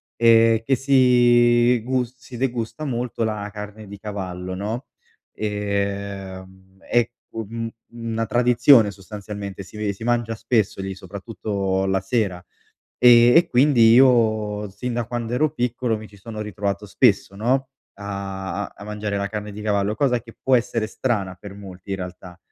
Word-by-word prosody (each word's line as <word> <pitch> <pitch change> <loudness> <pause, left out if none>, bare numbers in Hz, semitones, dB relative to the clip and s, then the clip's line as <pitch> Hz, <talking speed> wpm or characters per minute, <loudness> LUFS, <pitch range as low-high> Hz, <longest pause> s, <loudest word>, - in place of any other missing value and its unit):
ehm, 115 -1 +5
che 135 +3 +2
si 120 -2 +4
gus 125 0 -1
si 125 -1 -11
degusta 120 +2 -3
molto 120 -3 -2
la 105 -2 -3
carne 105 0 -8
di 100 +1 -9
cavallo, 95 -3 -5
no, 110 +7 -4 0.5
ehm, 100 -2 -4
è 120 -1 +3 0.2
un 115 +1 -5 0.3
una 115 -1 -3
tradizione, 120 -1 +5
sostanzialmente, 100 -1 -8
si 95 - -13
ve 105 -1 -1
si 100 - -10
mangia 120 -1 0
spesso 110 -3 0
lì, 95 0 -5
soprattutto 95 0 -3
la 95 0 +1
sera. 95 -3 -1 0.6
Ehm, 120 +1 +7
e 170 +1 +5
quindi 120 -3 +5
io, 110 -5 +3
sin 115 +6 -5
da 120 -1 -2
quando 120 -1 -4
ero 150 +4 +2
piccolo, 120 -3 -1
mi 110 - -10
ci 105 - -17
sono 110 +2 -8
ritrovato 100 0 -3
spesso, 100 -2 +2
no, 130 +5 0 0.3
a 100 -1 -5
a - - -10
a - - -10
mangiare 105 -1 -3
la 100 0 -2
carne 105 0 -5
di 105 - -8
cavallo, 105 0 0
cosa 125 -2 +1
che 115 0 -15
può 130 -1 +4
essere 115 -2 -1
strana 105 -5 -2
per 100 +1 -10
molti, 95 -1 -11
in 95 - -1
realtà. 90 -1 -9
110 Hz, 155 wpm, -22 LUFS, 100-120 Hz, 0.6 s, Ehm